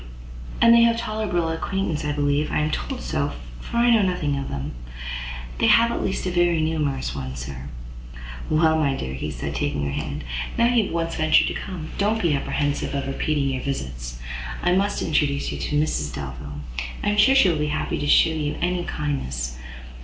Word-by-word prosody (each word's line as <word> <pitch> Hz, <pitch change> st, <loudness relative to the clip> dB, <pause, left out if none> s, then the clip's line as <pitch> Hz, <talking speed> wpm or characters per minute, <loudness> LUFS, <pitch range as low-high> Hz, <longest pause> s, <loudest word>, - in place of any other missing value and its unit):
"And 230 Hz, 0 st, +7 dB
they 235 Hz, -, +7 dB
have 235 Hz, 0 st, +5 dB
a -, -, -6 dB
tolerable 215 Hz, -7 st, -1 dB
acquaintance, 165 Hz, -1 st, -2 dB
I 150 Hz, -, -1 dB
believe: 145 Hz, +1 st, +1 dB
I -, -, +1 dB
am 150 Hz, 0 st, +1 dB
told -, -, -3 dB
so; -, -, -1 dB, 0.3 s
for 235 Hz, -, -5 dB
I 240 Hz, 0 st, +5 dB
know 225 Hz, -2 st, +5 dB
nothing 180 Hz, -7 st, 0 dB
of 140 Hz, 0 st, -4 dB
them." 70 Hz, +1 st, -4 dB, 0.9 s
"They -, -, +4 dB
have, 235 Hz, 0 st, +6 dB
at -, -, -2 dB
least, 190 Hz, -, -1 dB
a 185 Hz, -, 0 dB
very 175 Hz, -2 st, +3 dB
numerous 150 Hz, -4 st, -1 dB
one, 65 Hz, -2 st, -5 dB
sir." 65 Hz, +1 st, -7 dB, 0.8 s
"Well, 160 Hz, 0 st, +4 dB
my 140 Hz, -3 st, +2 dB
dear," 65 Hz, -, -4 dB
said -, -, -4 dB
he, -, -, +1 dB
taking 70 Hz, 0 st, -2 dB
her 70 Hz, -, -1 dB
hand, 70 Hz, +1 st, -4 dB, 0.3 s
"now 235 Hz, -, +4 dB
you 230 Hz, -4 st, +4 dB
have -, -, -6 dB
once 165 Hz, 0 st, -1 dB
ventured 155 Hz, 0 st, +5 dB
to -, -, -3 dB
come, 175 Hz, -5 st, -6 dB
don't 210 Hz, +3 st, +2 dB
be 170 Hz, -7 st, +2 dB
apprehensive 145 Hz, 0 st, -1 dB
of 140 Hz, -, -1 dB
repeating 140 Hz, +1 st, 0 dB
your 130 Hz, -1 st, -2 dB
visits. 65 Hz, -, -4 dB, 0.5 s
I -, -, +3 dB
must 200 Hz, +3 st, +1 dB
introduce 145 Hz, -2 st, +1 dB
you -, -, -5 dB
to 150 Hz, -, 0 dB
Mrs 75 Hz, -, 0 dB
Delvile; 70 Hz, +1 st, -6 dB, 0.4 s
I -, -, +2 dB
am 210 Hz, -, 0 dB
sure 265 Hz, +6 st, +6 dB
she 235 Hz, -9 st, +6 dB
will 165 Hz, -, +1 dB
be 150 Hz, -, 0 dB
happy 155 Hz, +1 st, -1 dB
to 145 Hz, -, -2 dB
shew 160 Hz, -, +5 dB
you 150 Hz, -2 st, -2 dB
any 175 Hz, 0 st, 0 dB
kindness. 65 Hz, -, -3 dB
150 Hz, 205 wpm, -24 LUFS, 130-180 Hz, 0.9 s, And